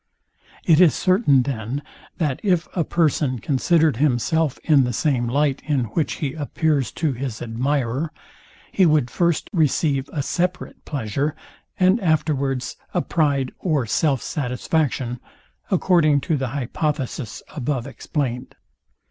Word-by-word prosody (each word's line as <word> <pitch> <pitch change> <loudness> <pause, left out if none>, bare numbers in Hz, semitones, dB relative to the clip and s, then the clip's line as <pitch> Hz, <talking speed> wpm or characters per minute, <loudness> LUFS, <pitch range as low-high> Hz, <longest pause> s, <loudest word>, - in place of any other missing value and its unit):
It 165 0 +5
is 175 -4 +6
certain, 185 - +3
then, 130 +1 -4 0.3
that 150 -6 -1
if 180 -5 +1
a 170 - +2
person 150 -6 +1
considered 150 +3 +2
himself 150 +2 +1
in 145 -4 +5
the 125 -1 -1
same 125 -2 +1
light, 140 +2 +1
in 145 -4 0
which 160 - 0
he 140 -3 -3
appears 150 -4 0
to 155 -4 -1
his 125 -2 -5
admirer, 130 +4 -1 0.6
he 190 -3 +4
would 150 -6 +2
first 170 +1 +1
receive 145 -4 +1
a 145 - -2
separate 180 +4 -2
pleasure, 140 +2 -2 0.4
and 185 +4 +4
afterwards 140 -6 0 0.2
a 175 - +2
pride 140 -5 +1
or 150 -8 0
self 135 +3 +1
satisfaction, 125 -1 -1 0.5
according 170 -6 +3
to 165 0 0
the 135 -2 -1
hypothesis 135 - -3
above 135 -3 -2
explained. 130 -2 -4
145 Hz, 130 wpm, -22 LUFS, 130-160 Hz, 0.6 s, is